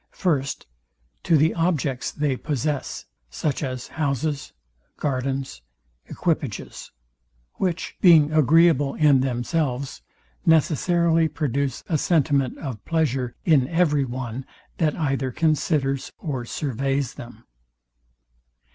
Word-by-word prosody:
FIRST, 140 -7 -1 0.6
To 165 - +3
the 155 +3 +3
objects 155 -6 0
they 145 -3 -1
possess; 145 0 -3 0.2
such 140 - -2
as 130 -3 -4
houses, 145 -1 -2 0.5
gardens, 135 - -2 0.5
equipages; 150 - -3 0.7
which, 180 -3 -2
being 160 -5 +6
agreeable 155 -1 +4
in 145 -4 +5
themselves, 130 +1 -2 0.4
necessarily 165 +1 +3
produce 140 -3 -2
a 160 -4 0
sentiment 140 -6 +1
of 130 -8 -6
pleasure 135 -7 -1
in 140 -6 +4
every 155 -3 +2
one; 125 0 -5 0.4
that 155 -3 +2
either 135 -5 -1
considers 150 -2 0
or 135 -6 -4
surveys 135 0 -2
them. 120 0 -11
145 Hz, 100 wpm, -24 LUFS, 130-160 Hz, 0.7 s, being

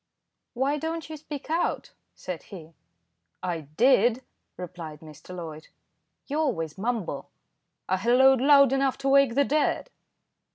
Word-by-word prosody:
"Why 275 +4 0
don't 320 +1 -4
you 310 - -6
speak 295 0 -8
out?" 335 +2 -1 0.2
said 180 -3 -6
he. 165 -4 -11 0.7
"I 175 -3 -2 0.2
did," 245 0 +4 0.3
replied 165 -4 -8
Mr. 155 +3 -11
Loyd. 160 -3 -8 0.6
"You 290 +2 -2
always 165 - -1
mumble." 205 - -3 0.6
"I 185 - +1
halloaed 250 +5 +4
loud 280 -1 +6
enough 270 -1 +1
to 275 0 -1
wake 275 -3 +4
the 280 +1 +4
dead." 305 - 0
245 Hz, 130 wpm, -26 LUFS, 180-280 Hz, 0.7 s, loud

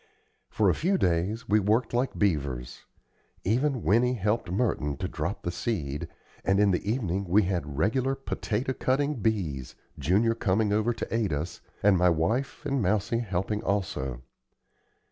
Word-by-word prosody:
For - - +2
a - - +5
few 190 +3 +1
days 90 - 0
we 105 +1 +4
worked 110 +5 +1
like 125 +2 0
beavers. 70 - -1 0.6
Even 125 +4 +1
Winnie 125 +5 +3
helped 105 -2 -1
Merton 90 - 0
to - - -2
drop - - -4
the 85 - -1
seed; 75 -8 -3 0.4
and 95 +1 +2
in 105 -1 +5
the 95 +3 0
evening 100 -6 -1
we 100 +5 +4
had 85 -7 -2
regular 130 - +1
potato 130 -2 -2
cutting 140 +3 0
"bees," 85 - -1 0.2
Junior 110 +7 +3
coming 105 -1 +1
over 110 +3 +2
to 115 - -5
aid 110 -5 +1
us, 75 +4 -3 0.2
and 100 -3 +5
my 90 0 +5
wife 105 - 0
and 135 -2 0
Mousie 105 +4 +1
helping 105 -1 -2
also. 65 -11 -2
105 Hz, 155 wpm, -28 LUFS, 85-115 Hz, 0.6 s, a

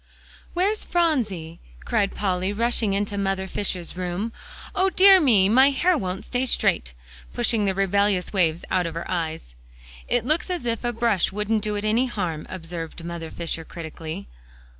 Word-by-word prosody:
"Where's 400 +5 +1
Phronsie?" 220 - 0 0.3
cried 195 - 0
Polly, 190 -1 0
rushing 225 -1 +1
into 200 0 -1
Mother 195 -1 -1
Fisher's 185 -3 -4
room; 185 +5 -3 0.4
"O 380 0 +2
dear 380 0 +7
me, 215 -10 +5
my 260 +6 +6
hair 345 +6 +2
won't 190 -8 -3
stay 255 +1 -1
straight," - - +1 0.4
pushing 220 -3 +1
the 190 -1 0
rebellious 195 0 +1
waves 170 -4 +1
out 180 -2 +2
of 165 - -6
her 170 - -4
eyes. 160 - -3 0.5
"It 240 -2 +1
looks 310 +7 +1
as 355 -8 -3
if 230 0 -2
a 240 - 0
brush 230 -5 +1
wouldn't 210 +2 0
do 210 0 -2
it 205 +1 -3
any 230 +5 +2
harm," 175 -9 -3
observed 165 -2 -6
Mother 170 -1 -5
Fisher 165 -1 -4
critically. 160 - -7
200 Hz, 160 wpm, -24 LUFS, 175-240 Hz, 0.5 s, dear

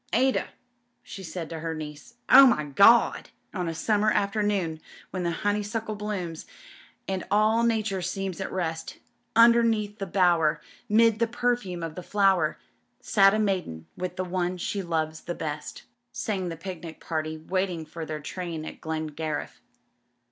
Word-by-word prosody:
*Ada,' 265 0 +2 0.6
she 195 - -9
said 175 -2 -6
to 165 - -5
her 165 0 -3
niece... 155 +8 -9
Oh, 270 +1 +10
my 150 -11 +2
Gawdl'*... 200 - +5
■i - - -24 0.2
On 180 -3 -2
a 165 - -4
summer 210 +5 +2
afternoon, 200 -6 0 0.3
when 185 - -3
the 170 - 0 0.2
honeysuckle 210 +2 -1
blooms, 200 -6 -5 0.6
And 190 -1 -2
all 215 +2 +3
Nature 220 -4 0
seems 190 +1 -3
at 190 - -4
rest, 165 -3 -3 0.4
Underneath 230 -2 +4
the 195 - -3
bower, 170 -4 +3 0.3
'mid 225 +1 +4
the 230 - +2
perfume 240 -7 -1
of 165 -1 -4
the 180 - -7
flower, 195 0 +2 0.4
Sat 195 -1 +4
a - - +1
maiden 185 - -1
with 180 -1 -4
the 185 - -2
one 180 0 -1
she 195 +3 -2
loves 160 -3 -2
the 175 - -5
best 150 -1 -5 0.2
" 240 - -51
sang 190 -4 -2
the 165 - -6
picnio 170 -2 -8
party 155 -1 -3
waiting 180 0 -2
for 160 +2 -7
their 155 -1 -4
train 165 -1 -5
at - - -9
Glen 160 0 -3
gariff. 155 0 -4
185 Hz, 160 wpm, -26 LUFS, 165-210 Hz, 0.6 s, Oh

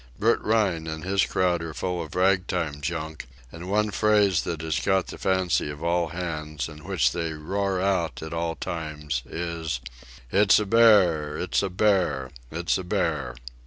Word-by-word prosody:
Bert 115 +3 +2
Rhine 100 -7 +1
and 80 0 -5
his 95 +1 +2
crowd 90 -2 +1
are 80 -2 -6
full 90 -2 -2
of 80 +1 -8
rag 95 0 +3
time 80 -6 -2
junk, 80 -3 -4 0.2
and 85 +2 -8
one 105 +1 +1
phrase 105 -5 +3
that 80 -3 -3
has 80 -1 -1
caught 95 -2 +1
the - - -9
fancy 95 -5 +1
of 75 +2 -7
all 85 0 +1
hands, 75 -5 -4
and 75 -1 -11
which 80 -9 +1
they 85 0 -2
roar 95 +5 -2
out 90 -5 0
at 80 +1 -6
all 85 0 -2
times, 75 -6 -4
is: 80 -4 -3 0.5
"It's 100 +1 +5
a 105 - +1
bear! 95 -9 +4
It's - - 0
a 100 - -1
bear! 90 -9 +1 0.2
It's 85 +5 -1
a - - -4
bear!" 80 - -1
85 Hz, 175 wpm, -25 LUFS, 80-95 Hz, 0.5 s, It's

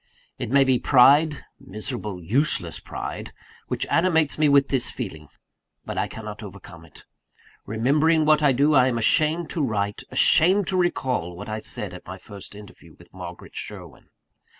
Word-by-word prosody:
It - - -4
may 140 +2 +5
be 130 -2 +2
pride 145 +4 +4
miserable, 105 -2 -5
useless 135 - -1
pride - - -7 0.4
which - - -2
animates 165 -4 +2
me 155 -1 +4
with 140 -1 +4
this 130 -3 0
feeling: 80 - -7 0.6
but - - -5
I - - -1
cannot 105 -2 -8
overcome 95 -4 -12
it. 80 - -16 0.6
Remembering 150 +8 +2
what 155 0 +4
I 145 -2 +4
do, 140 +4 +2
I 130 -2 +5
am 120 -2 -1
ashamed 155 +7 +1
to 165 - -2
write, 105 -6 -2
ashamed 190 +5 +4
to 190 - -1
recall, 130 - -1
what 100 +4 -8
I 110 0 -3
said 110 - -3
at - - -12
my - - -7
first 100 0 -8
interview 105 -1 -14
with - - -19
Margaret - - -10
Sherwin. - - -8
130 Hz, 165 wpm, -23 LUFS, 105-155 Hz, 0.6 s, may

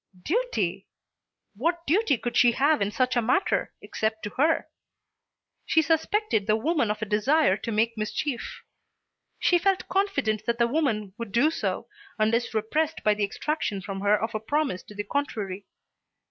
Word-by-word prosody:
Duty! - - -1 0.7
What 335 - -1
duty 335 - +2
could 240 +1 -4
she 240 -1 +5
have 285 +3 +2
in 200 - +1
such 250 +4 0
a 240 - +3
matter, 260 - +1
except 220 0 -2
to 210 - -4
her? 310 +4 +1 1.0
She 320 - +3
suspected 320 - +1
the 215 - +4
woman 285 0 +1
of 210 +1 -2
a - - -1
desire 215 +4 +3
to 230 - -5
make 225 +2 +1
mischief. 240 +5 -3 0.7
She 350 - +3
felt 385 +1 +1
confident 300 - 0
that 235 0 +1
the 235 - +3
woman 230 -8 -1
would 230 -3 -5
do 265 +9 +3
so - - -3 0.3
unless 230 +2 +1
repressed 300 +9 0
by 210 - +4
the 210 0 -2
extraction 205 0 -2
from 195 0 -6
her 205 +1 +3
of 225 +1 -3
a 215 - -1
promise 270 -2 -1
to 210 - -13
the 205 - -3
contrary. 205 -8 -3
235 Hz, 165 wpm, -26 LUFS, 215-310 Hz, 1.0 s, she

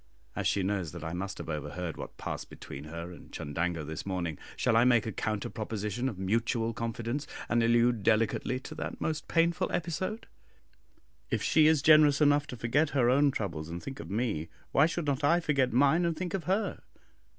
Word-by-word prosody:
As - - 0
she 100 - +1
knows 95 -4 -1
that 85 -2 -7
I 80 0 -4
must 95 +3 -4
have - - -7
overheard 80 +2 -4
what - - -8
passed - - -5
between 70 +2 -9
her 85 +3 -7
and 90 - -13
Chundango 85 +2 -2
this 80 +1 -5
morning, 90 -5 -3 0.2
shall 115 - +2
I 115 - +6
make 120 -3 +4
a 110 - -2
counter 105 0 -2
proposition 110 +3 -3
of 105 - -7
mutual 115 +4 0
confidence, 115 +5 -3 0.2
and 120 0 +2
allude 120 0 +3
delicately 115 +4 +1
to - - -8
that - - -5
most 155 -1 -2
painful 170 0 +2
episode! 175 +6 -2 1.0
If - - -1
she 155 -1 +5
is 155 -3 +3
generous 155 -2 +6
enough 145 -1 +4
to 125 - -7
forget 145 +7 +1
her 120 -2 +4
own 140 +2 +4
troubles 85 - -3
and 85 +1 -6
think 135 0 -7
of - - -8
me, 100 -7 -1 0.2
why 140 +3 +5
should 170 -1 -3
not 140 0 -1
I 170 +4 +4
forget 140 -6 +1
mine 140 +8 +4
and 170 -2 0
think 180 -1 -4
of 190 -4 -2
her? 195 +4 0
115 Hz, 195 wpm, -30 LUFS, 95-145 Hz, 1.0 s, I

